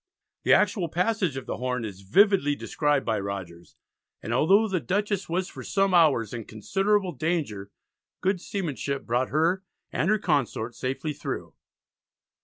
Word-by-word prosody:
The - - +4
actual 190 -4 +2
passage 180 - 0
of 135 - -6
the - - -4
Horn 125 -2 -2
is 100 -3 -8
vividly 145 - +4
described 145 -1 0
by 110 -2 0
Rogers, 95 -4 -6 0.4
and 115 - -4
although 195 - +4
the 190 -3 0
Dutchess 200 +3 -1
was 180 +2 0
for - - -9
some 195 -1 +1
hours 145 - +4
in 115 -3 -5
considerable 195 - 0
danger, 155 - -2 0.5
good 185 -1 0
seamanship 145 -8 -3
brought 125 +2 0
her 165 +6 +1 0.3
and 170 - 0
her 215 - +4
consort 140 - 0
safely 135 +5 -3
through. 145 - -5
155 Hz, 150 wpm, -26 LUFS, 120-190 Hz, 0.5 s, The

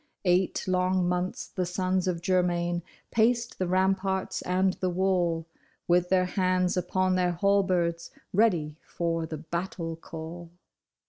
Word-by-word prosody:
Eight 180 +1 +2
long 185 0 +2
months 180 +1 -1
the 185 - -3
sons 185 +1 0
of 170 -2 -2
Germain 175 -1 +1 0.3
paced 235 +1 +1
the 185 - 0
ramparts 190 +1 0
and 185 +1 +1
the 185 - 0
wall, 175 -3 +1 0.4
With 175 0 +3
their 185 -1 +3
hands 185 -1 +1
upon 185 +1 +1
their 180 -1 +2
halberds, 180 -3 +1 0.2
ready 175 -8 +2
for 165 -1 -2
the 155 - -5
battle 165 +1 -4
call. 165 +1 -8
180 Hz, 130 wpm, -28 LUFS, 170-185 Hz, 0.4 s, With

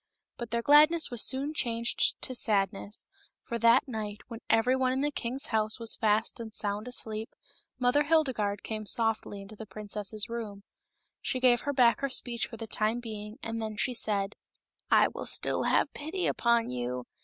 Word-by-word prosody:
But 235 -2 -6
their 235 +1 -1
gladness 305 +3 +5
was 240 -2 0
soon 275 +3 0
changed 235 -4 0
to 255 - -3
sadness, 205 -3 0 0.3
for 235 - -5
that 235 +6 +5
night, 215 -4 -5
when 230 -2 -7
every 235 +3 +4
one 260 -1 +1
in 260 +1 0
the 295 +1 0
king's 260 0 -2
house 215 +1 +1
was 230 -1 -1
fast 220 +1 +1
and 225 -1 -6
sound 210 +1 -3
asleep, 220 -3 -1 0.5
Mother 255 +4 +2
Hilde 310 -3 +3
garde 205 -3 -2
came 215 -1 -5
softly 220 -3 0
into 205 +2 -12
the 220 +1 -9
princess's 210 +1 -3
room. 220 -4 -6 0.6
She 255 - -2
gave 250 -1 +4
her 285 - -1
back 245 -3 +4
her 275 - -1
speech 240 -2 -2
for 230 - -10
the 225 - -6
time 220 +2 -1
being, 215 -2 -7
and 225 0 -3
then 215 -1 -4
she 250 - +1
said. 205 -3 -1 0.3
" - - -54
I - - +6
will - - -6
still - - +1
have - - +2
pity 325 +6 -3
upon 235 - +2
you. 125 0 -3
230 Hz, 190 wpm, -29 LUFS, 215-255 Hz, 0.6 s, I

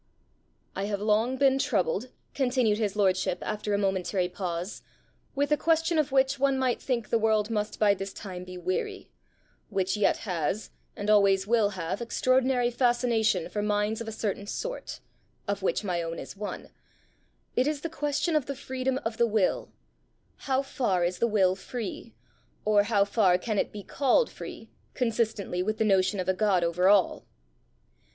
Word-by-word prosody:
"I 195 - -2
have 205 -1 -2
long 220 +5 +1
been 270 0 +4
troubled," 225 - 0 0.2
continued 245 -5 +1
his 210 -3 -1
lordship 185 -3 +1
after 210 0 -3
a 200 - +2
momentary 190 -2 0
pause, 180 0 -4 0.5
"with 285 +2 0
a 300 - +4
question 325 +1 +2
of 300 -2 0
which 270 0 +2
one 275 0 +2
might 255 -2 0
think 235 -5 -2
the 230 - +3
world 220 0 +2
must 210 -1 -2
by 210 -2 +4
this 195 0 -5
time 185 -3 -7
be 185 0 -9
weary 180 +1 -3 0.6
which 190 -2 0
yet 210 -1 +2
has, 180 +2 -2 0.2
and 205 - -5
always 200 -2 +4
will 220 -1 +3
have, 175 +5 -3
extraordinary 255 +1 +2
fascination 240 -6 +2
for 210 - -3
minds 210 +1 0
of 230 - -6
a - - -3
certain 205 -2 -3
sort - - -5 0.5
of 200 0 -2
which 195 - 0
my 180 -4 -1
own 165 0 -4
is - - -8
one: 205 +1 -6 0.8
it 255 - +2
is 300 -2 -1
the 330 - -2
question 295 +1 -1
of 300 -4 +1
the 280 - -3
freedom 260 -1 -2
of 225 0 -2
the 235 - +3
will: 215 -4 0 0.8
how 265 0 +2
far 205 -10 0
is 180 +1 -2
the 235 - +3
will 190 -4 +3
free? 220 +2 -6 0.5
or 210 -1 +5
how 205 -3 +3
far 200 -3 +3
can 210 +2 -2
it - - -1
be 205 -1 -8
called 285 - +2
free, - - -9 0.2
consistently 220 -6 -1
with 215 +3 -1
the 220 - +1
notion 195 0 +2
of 185 - -2
a 190 - +3
God 190 -2 +2
over 175 +2 +2
all?" 200 -2 +3
215 Hz, 175 wpm, -28 LUFS, 195-250 Hz, 0.8 s, or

